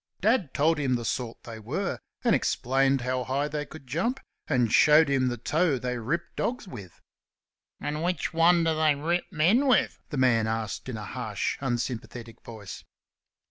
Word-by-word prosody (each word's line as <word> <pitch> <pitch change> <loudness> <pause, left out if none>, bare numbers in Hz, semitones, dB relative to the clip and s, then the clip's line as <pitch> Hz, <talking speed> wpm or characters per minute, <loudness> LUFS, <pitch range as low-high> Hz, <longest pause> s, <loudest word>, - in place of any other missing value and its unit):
Dad 210 - +2
told 155 +2 +2
him 130 -3 +1
the 120 -1 -3
sort 120 0 -3
they 115 -2 -8
were, 150 - -3 0.2
and - - +3
explained 135 +1 +1
how 125 +1 -1
high 135 +3 -1
they 150 0 -4
could 155 -3 -12
jump, 185 - -1 0.3
and 125 -6 +1
showed 155 +1 +6
him 130 -2 +2
the 120 -1 -2
toe 155 +5 +1
they 125 0 -3
ripped 150 +10 -3
dogs 245 -3 -2
with. 100 - -10 0.8
"And 150 +1 -3
which 175 -2 -1
one 170 +1 +4
do 165 -1 +2
they 155 -1 +3
rip 170 +5 -1
men 195 - +3
with?" 260 - +2
the 145 - -4
man 120 -4 +3
asked 110 +2 -3
in 120 - -4
a 105 - -6
harsh, - - -3
unsympathetic 120 -2 -4
voice. 105 -5 -9
135 Hz, 175 wpm, -27 LUFS, 120-165 Hz, 0.8 s, showed